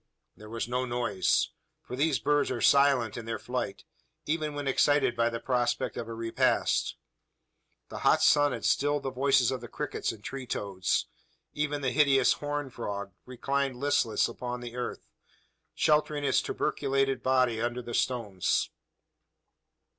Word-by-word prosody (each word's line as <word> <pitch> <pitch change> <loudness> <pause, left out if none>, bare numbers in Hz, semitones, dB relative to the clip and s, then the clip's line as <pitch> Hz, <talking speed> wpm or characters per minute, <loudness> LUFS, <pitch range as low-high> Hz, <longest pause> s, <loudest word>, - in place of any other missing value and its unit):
There 105 0 -13
was 115 0 -3
no 125 +1 -1
noise: 120 -6 +1 0.3
for 125 - -7
these 145 +1 +2
birds 145 0 +1
are 125 - -2
silent 135 -4 +4
in 115 - -6
their 115 -1 -3
flight 125 -4 -4 0.4
even 155 -1 -2
when 145 -1 -4
excited 140 -1 +3
by 115 0 +2
the 115 0 -4
prospect 120 -1 -1
of 115 - -5
a 115 - -6
repast. 115 0 +1 0.9
The - - -7
hot - - +3
sun 145 0 +5
had - - -4
stilled 145 0 +1
the 135 - -2
voices 130 -1 +3
of 130 -2 -3
the 120 - -8
crickets - - -3
and 110 -2 -12
tree 135 -2 -6
toads. 95 -4 -1 0.5
Even 145 -1 -2
the 130 -2 0
hideous 140 -3 +4
"horned 145 -3 -4
frog" 100 -3 -5 0.2
reclined 135 +1 -1
listless 140 -3 +1
along 125 0 -5
the 120 0 -8
earth, 125 - -5 0.7
sheltering 150 -1 +2
its 140 - +3
tuberculated 135 -1 -1
body 125 -3 +2
under 120 +1 -2
the 120 - -7
stones. 110 -9 0
125 Hz, 155 wpm, -29 LUFS, 115-140 Hz, 0.9 s, sun